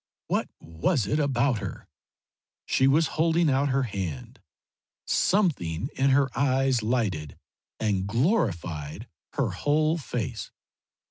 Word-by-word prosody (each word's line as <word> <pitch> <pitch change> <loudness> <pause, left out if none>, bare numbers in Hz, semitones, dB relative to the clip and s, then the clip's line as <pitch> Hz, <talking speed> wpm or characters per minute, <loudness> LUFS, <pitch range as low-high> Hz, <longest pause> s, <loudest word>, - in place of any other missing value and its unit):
What - - -1
was 90 - -1
it 110 +10 0
about 130 -4 +1
her? - - -7 0.8
She 130 - +3
was 155 +4 +4 0.2
holding 165 -1 +3
out 140 +2 +2
her 135 +1 +1
hand. 95 - -5 0.7
Something 130 - +1
in 135 +1 +2
her 135 -1 +2
eyes 135 -2 +2
lighted 105 - -1 0.4
and 100 -3 0
glorified 100 - -1 0.3
her - - 0
whole 155 +3 +1
face. 140 - -4
130 Hz, 115 wpm, -26 LUFS, 95-145 Hz, 0.8 s, was